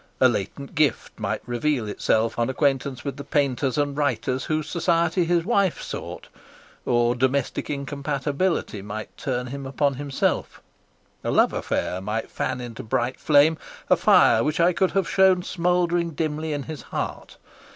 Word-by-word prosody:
A 130 Hz, -, +7 dB
latent 120 Hz, -, -3 dB
gift 155 Hz, -7 st, 0 dB
might -, -, -2 dB
reveal 120 Hz, 0 st, -1 dB
itself 110 Hz, +2 st, 0 dB
on 120 Hz, -, +1 dB
acquaintance 135 Hz, -1 st, 0 dB
with 140 Hz, -, -4 dB
the 140 Hz, -, -6 dB
painters 140 Hz, -1 st, 0 dB
and 145 Hz, -1 st, 0 dB
writers 130 Hz, -3 st, -1 dB
whose 155 Hz, -1 st, -1 dB
society 170 Hz, +1 st, +1 dB
his 170 Hz, 0 st, +1 dB
wife 200 Hz, -7 st, +2 dB
sought; -, -, -7 dB, 0.6 s
or 120 Hz, 0 st, +3 dB
domestic 130 Hz, +2 st, 0 dB
incompatability 140 Hz, -, -2 dB
might 105 Hz, +2 st, -7 dB
turn 125 Hz, -2 st, -2 dB
him 135 Hz, +2 st, -6 dB
upon 140 Hz, +1 st, +1 dB
himself; 140 Hz, 0 st, -2 dB, 0.6 s
a -, -, -2 dB
love -, -, +3 dB
affair 90 Hz, -, -2 dB
might 105 Hz, +3 st, -3 dB
fan 130 Hz, -1 st, -2 dB
into 120 Hz, -2 st, -7 dB
bright 120 Hz, +3 st, -1 dB
flame 155 Hz, +2 st, +4 dB, 0.3 s
a -, -, +8 dB
fire -, -, +5 dB
which 150 Hz, +2 st, -1 dB
I 175 Hz, +2 st, +4 dB
could 190 Hz, +1 st, +1 dB
have 195 Hz, -3 st, +1 dB
shown 190 Hz, -2 st, +4 dB
smouldering 175 Hz, -2 st, 0 dB
dimly 155 Hz, 0 st, -2 dB
in 145 Hz, -2 st, -2 dB
his 155 Hz, -1 st, -7 dB
heart. -, -, -5 dB
140 Hz, 155 wpm, -24 LUFS, 125-160 Hz, 0.6 s, a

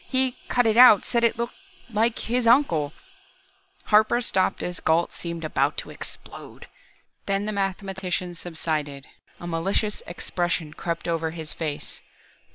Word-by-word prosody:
He 260 Hz, -1 st, +1 dB
cut 245 Hz, -1 st, +3 dB
it 220 Hz, 0 st, +2 dB
out, 245 Hz, -5 st, +8 dB
said 235 Hz, -1 st, +1 dB
it 230 Hz, -, +3 dB
looked 235 Hz, +1 st, -3 dB, 0.3 s
like 225 Hz, 0 st, +1 dB
like -, -, -4 dB
his 240 Hz, +1 st, 0 dB
uncle 175 Hz, -, +4 dB, 0.5 s
" 385 Hz, 0 st, -34 dB
Harper 215 Hz, +3 st, +5 dB
stopped 190 Hz, -6 st, +1 dB
as 180 Hz, -1 st, -3 dB
Gault 165 Hz, +2 st, +1 dB
seemed 170 Hz, -1 st, -5 dB
about 155 Hz, -, 0 dB
to -, -, -5 dB
explode. -, -, -9 dB, 0.6 s
Then 200 Hz, 0 st, 0 dB
the 215 Hz, -, -1 dB
mathematician 190 Hz, -2 st, -2 dB
subsided, 155 Hz, -5 st, -4 dB, 0.3 s
a -, -, -8 dB
malicious 190 Hz, +5 st, -1 dB
expression 175 Hz, -2 st, -2 dB
crept 170 Hz, +2 st, -4 dB
over 165 Hz, -1 st, 0 dB
his 160 Hz, -2 st, -6 dB
face. 150 Hz, -3 st, -5 dB
190 Hz, 150 wpm, -25 LUFS, 165-235 Hz, 0.6 s, out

